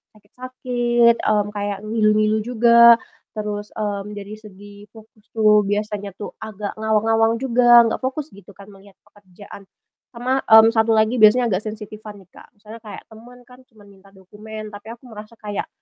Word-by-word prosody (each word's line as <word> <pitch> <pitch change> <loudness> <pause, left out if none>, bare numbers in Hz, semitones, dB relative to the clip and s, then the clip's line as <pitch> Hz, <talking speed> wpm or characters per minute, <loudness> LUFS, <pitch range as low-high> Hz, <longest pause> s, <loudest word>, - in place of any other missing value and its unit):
sakit-sakit, 240 +1 -1
mmm, 210 -1 0
kayak 205 -1 -5
ngilu-ngilu 215 0 +1
juga, 235 +1 +5 0.4
terus, 210 -1 -5
mmm, 205 -1 -5
dari 205 +1 -10
segi 205 0 -15
fokus 220 -1 -19
tuh 215 -1 +4
biasanya 205 -1 -4
tuh, 210 - -8
agak 210 -2 -7
ngawang-ngawang 225 +1 +1
juga 240 -1 +4
nggak 230 - -2
fokus 270 +3 -5
gitu 200 0 -17
kan 200 +2 -15
melihat 195 0 -19
pekerjaan. 200 0 -16 0.5
Sama, 255 +3 -1
mmm, 220 0 +7
1 225 0 +1
lagi 220 +3 +1
biasanya 225 +2 +4
agak 185 - 0
sensitifan 215 0 -9
nih, 180 - -32
Kak, - - -17
misalnya 215 +2 -13
kayak 215 -2 -11
temen 245 +3 -16
kan 250 +1 -19
cuma 220 -4 -22
minta 200 -1 -20
dokumen 215 +3 -11
tapi 205 +1 -13
aku 235 - -35
merasa 215 +1 -12
kayak, 210 -2 -6
215 Hz, 160 wpm, -20 LUFS, 205-230 Hz, 0.5 s, mmm